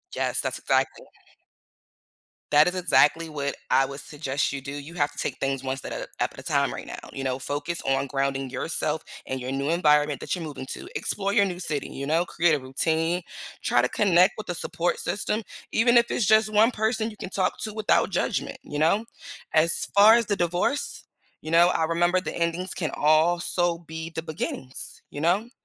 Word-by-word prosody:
Yes, - - 0
that's - - -3
exactly - - 0 1.5
that 150 +2 +6
is 180 - -1
exactly 165 -2 +3
what 140 -2 -3
I 135 - +4
would 140 +1 -7
suggest 145 -2 -2
you 140 -1 -4
do, 140 - -7
you 145 +4 -8
have 145 -3 +1
to - - -20
take - - -2
things 135 -1 -1
one 130 0 -2
step - - -7
up - - -4 0.2
at - - 0
a - - -17
at - - -10
a - - -10
time - - +1
right - - -7
now, - - -7 0.2
you 135 - -5
know? 130 -1 -1
Focus 145 +5 -3
on 135 +1 0
grounding 135 -1 -1
yourself 155 +2 -2 0.2
and 130 - -3
your 130 +1 -4
new 140 +2 -1
environment 150 -4 +3
that - - -2
you're 175 - -6
moving 145 -4 -6
to. - - -7
Explore 200 0 -1
your 200 -2 +5
new 180 -2 -4
city, 150 -5 -2
you 140 +1 -6
know? 165 +3 +2
Create 170 -2 +2
a - - -2
routine. 160 +6 0 0.4
Try - - +3
to - - +1
connect 185 -2 +4
with 215 - -7
the 175 - -3
support 170 +1 -2
system 210 +2 -2 0.3
even 240 +2 +4
if 235 0 +4
it's 230 - 0
just 215 +1 +4
one 215 +3 +5
person 220 0 0
you 210 - -14
can - - -6
talk 190 -1 -1
to 215 - -5
without 215 -2 +2
judgment, 180 - -1
you 145 - -5
know? 185 +8 +3 0.5
As 165 +2 +3
far 210 +3 +8
as 235 -1 +2
the 205 - 0
divorce, 175 - -1 0.4
you 155 - -6
know, 170 +1 +6
I 165 -2 +1
remember 175 +2 +2
the 185 - -5
endings 170 +2 -1
can 160 -4 -3
also 170 +3 +2
be 160 0 -7
the 160 - -3
beginnings, 135 -5 -5
you 145 - -6
know? 190 +8 +1
165 Hz, 210 wpm, -25 LUFS, 145-185 Hz, 1.5 s, far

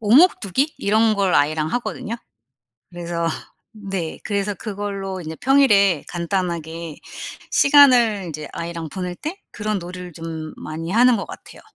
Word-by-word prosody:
오목두기? 260 - +4
이런 220 +2 +3
걸 195 -3 +1
아이랑 155 +2 +2
하거든요. 235 -2 -3 0.8
그래서 170 -1 -3 0.5
네. 195 -5 -4
그래서 200 0 -1
그걸로 195 -2 -4
이제 160 0 -6
평일에 205 - +4
간단하게 170 -2 -3 0.6
시간을 250 -8 +6
이제 155 -1 -6
아이랑 170 -1 -5
보낼 180 +1 -4
때 320 - -6
그런 210 -1 -2
놀이를 180 0 -8
좀 160 -1 -6
많이 160 +2 -6
하는 245 +3 +5
것 - - -5
같아요. - - -11
190 Hz, 295 characters per minute, -21 LUFS, 170-215 Hz, 0.8 s, 시간을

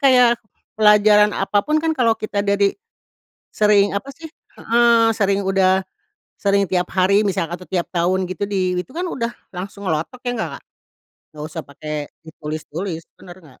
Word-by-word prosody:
kayak 250 -3 +5 0.4
pelajaran 210 0 +5
apa 200 +1 +1
pun 305 +7 0
kan 325 -1 +1
kalau 230 -6 +2
kita 210 -2 -3
ada 200 0 +1
di 200 0 +2 0.8
sering, 205 -1 +4
apa 200 +7 -3
sih, 325 +3 -11 0.3
heeh, 230 -1 +4
sering, 200 -1 +1
udah 190 -1 +2 0.6
sering 200 -1 +2
tiap 180 0 -1
hari 195 +3 +3
misal 180 -3 0
atau 180 - -9
tiap 180 -2 -2
tahun 180 +2 +1
gitu, 185 +1 -7
di 185 -2 0
itu 180 - -5
kan 355 +3 -4
udah 235 -8 -3 0.2
langsung 195 +2 -7
ngelotok, 160 +10 -2
iya - - +1
enggak 220 - -3
Kak? - - -28 0.7
Enggak 150 0 -7
usah 160 0 -6
pakai 150 +2 -8 0.3
ditulis-tulis, 160 +3 -6
benar 175 0 -13
enggak? 145 -7 -19
200 Hz, 170 wpm, -20 LUFS, 180-220 Hz, 0.8 s, kayak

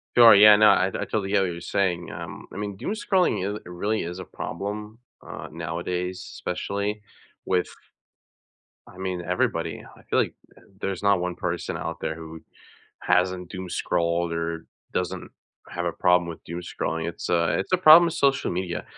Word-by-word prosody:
Oh, 120 -2 +9
yeah, 105 0 +9
no, 105 0 +6
I 95 - +4
I - - -11
totally 100 -3 -2
hear 100 -1 +4
what 95 -2 0
you're 85 - -7
saying, 90 -1 -1
um, - - -8
I - - -8
mean, 100 -1 -4
doomscrolling 190 - 0
is - - -6
really 100 +5 -2
is 90 +2 -6
a 95 - -7
problem, 105 +7 -6 0.3
uh, - - -7
nowadays, 85 +3 -3 0.2
especially 100 +3 -3 0.4
with 90 -1 +1 1.2
I 90 - -15
mean, 95 -2 -3
everybody. 90 +1 -1
I - - -18
feel - - +2
like - - +1 0.5
there's 95 -2 -3
not 100 -1 +4
one 90 0 -3
person 90 -1 -3
out 85 0 -5
there - - -2
who 80 0 -10 0.6
hasn't 90 -1 +1
doomscrolled 85 -2 -1
or 85 0 -3 0.3
doesn't 90 -2 -3 0.4
have 85 0 -3
a 85 - 0
problem 90 0 +3
with 85 - -8
doomscrolling. 85 -1 -4
It's 85 - -5
a 85 -1 +2
it's - - -6
a 185 - +4
problem 170 0 +9
with 165 - -2
social 140 -3 +2
media, 90 0 -3
90 Hz, 170 wpm, -25 LUFS, 85-100 Hz, 1.2 s, Oh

